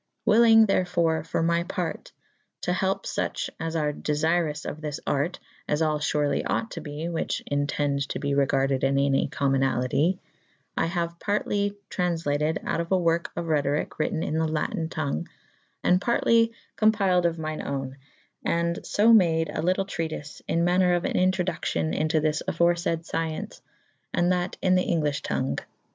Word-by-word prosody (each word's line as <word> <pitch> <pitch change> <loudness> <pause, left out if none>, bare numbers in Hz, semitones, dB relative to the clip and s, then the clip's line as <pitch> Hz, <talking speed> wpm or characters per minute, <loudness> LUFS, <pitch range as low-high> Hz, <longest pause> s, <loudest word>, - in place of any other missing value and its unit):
^ - - +5
Wyllynge 225 0 +7
therfore 170 -5 +1
for 165 - -1
my 170 +1 +2
parte 175 -1 -4 0.5
to - - 0
helpe - - -1
fuche - - -2
as 165 0 -3
ar 150 -2 0
defyrous 155 +1 0
of 155 - -5
this 150 -2 -4
arte 145 +6 -1 0.3
(as 150 +2 +1
all 155 -1 +1
furely 150 -1 +1
ought 225 - -1
to 170 - -6
be 150 0 -6
whiche 170 -1 -2
entende 145 -1 0
to - - -4
be 140 -1 -1
regarded 135 -1 +1
in 135 0 +2
any 140 0 +2
comynaltye) 135 +4 +1 0.6
I - - +1
haue 170 -1 -1
partely 205 0 0 0.2
traunflatyd" 160 -4 0
out - - 0
of 170 - -4
awerke 170 -3 +2
of 170 - -3
Rhethoryke 145 -2 0
wrytten 160 +1 0
in 155 +1 -1
the 160 - +1
lattyn'^ 155 +1 -2
tongue, 140 - -2 0.6
and 180 +1 +3
partely 230 0 +3 0.3
compyled 195 -5 +3
of 170 0 -3
myne 155 -1 -4
owne, 135 -1 -3 0.9
& - - -10
fo 225 +3 +6
made 165 -6 +4
a - - -2
lytle 185 +3 +1
treatife 160 -5 -5
in 170 - +1
maner 180 0 +3
of 175 - -1
an - - -1
Introduccyon 180 -3 0
into 155 0 +1
this 150 0 0
aforefaid 170 0 +1
fcyence, 160 -1 -3 0.5
and 175 +1 +2
that 180 0 -1
in 185 -1 +4
the"* 180 0 +3
englyffhe 150 -3 0
tongue. 130 - -1
165 Hz, 160 wpm, -26 LUFS, 150-180 Hz, 0.9 s, Wyllynge